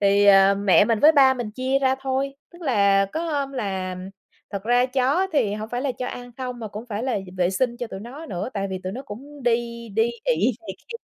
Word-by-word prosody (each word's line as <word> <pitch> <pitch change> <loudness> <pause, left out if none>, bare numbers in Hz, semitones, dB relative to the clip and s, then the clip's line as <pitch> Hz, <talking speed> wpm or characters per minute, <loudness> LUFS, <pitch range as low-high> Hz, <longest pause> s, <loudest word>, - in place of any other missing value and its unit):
Thì, 200 0 +4
ờ, 195 0 +7
mẹ 200 0 +4
mình 225 -2 +1
với 310 +2 +7
ba 265 -3 +6
mình 240 -4 -4
chia 260 +4 0
ra 265 -1 +2
thôi. 270 +1 -1 0.2
Tức 345 0 -14
là 200 -7 +3
có 320 - -2
hôm 285 -4 -2
là 190 -7 -3 0.5
thật 200 -1 -4
ra 245 +2 +3
chó 260 +2 +1
á 385 - +2
thì 210 -9 +1
hổng 215 +1 -5
phải 245 +2 -3
là 275 -3 0
cho 250 - -3
ăn 245 0 -7
không 250 -2 -5
mà 220 -2 -6
cũng 210 +4 -8
phải 215 -2 -4
là 255 -5 0
d - - -12
vệ 180 -1 +2
sinh 240 +5 0
cho 245 - -4
tụi 195 - -8
nó 270 +9 -9
nữa, 180 +1 -4
tại 195 -1 -1
vì 185 - -3
tụi 185 +1 -4
nó 255 - -6
cũng 275 +5 -10
đi 235 -1 -1
đi 225 +3 +1
ị 195 +11 +2
này 330 - -7
kia 465 - -9
240 Hz, 255 wpm, -23 LUFS, 200-265 Hz, 0.5 s, ờ